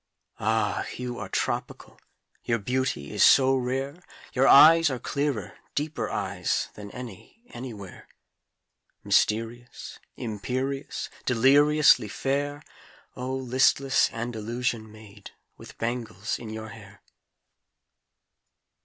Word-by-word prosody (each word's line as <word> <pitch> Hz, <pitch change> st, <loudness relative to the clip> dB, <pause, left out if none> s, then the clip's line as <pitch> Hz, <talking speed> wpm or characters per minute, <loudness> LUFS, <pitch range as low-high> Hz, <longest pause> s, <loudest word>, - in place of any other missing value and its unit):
ah, -, -, 0 dB
you 125 Hz, -1 st, -5 dB
are -, -, -6 dB
tropical, -, -, -3 dB, 0.4 s
Your 115 Hz, -, 0 dB
beauty 125 Hz, -, -2 dB
is -, -, +3 dB
so 135 Hz, 0 st, +6 dB
rare: 135 Hz, +5 st, -3 dB, 0.3 s
Your 130 Hz, +1 st, +3 dB
eyes 160 Hz, +2 st, +8 dB
are 130 Hz, -, -3 dB
clearer, 140 Hz, -1 st, -3 dB, 0.2 s
deeper 155 Hz, +2 st, -2 dB
eyes -, -, -2 dB
Than 105 Hz, -1 st, -10 dB
any, 125 Hz, -, -11 dB
anywhere; 115 Hz, -6 st, -9 dB, 1.0 s
Mysterious, 115 Hz, +4 st, -1 dB, 0.2 s
imperious, 130 Hz, +5 st, -4 dB, 0.2 s
Deliriously 140 Hz, +1 st, +5 dB
fair, 145 Hz, +6 st, -2 dB, 0.5 s
O 125 Hz, +1 st, -4 dB
listless 130 Hz, +1 st, +2 dB
Andalusian 115 Hz, 0 st, -3 dB
maid, 105 Hz, -2 st, -13 dB, 0.3 s
With -, -, -14 dB
bangles 115 Hz, -3 st, -3 dB
in 115 Hz, -, -8 dB
your 110 Hz, 0 st, -7 dB
hair! 100 Hz, -3 st, -14 dB
125 Hz, 100 wpm, -26 LUFS, 110-135 Hz, 1.0 s, eyes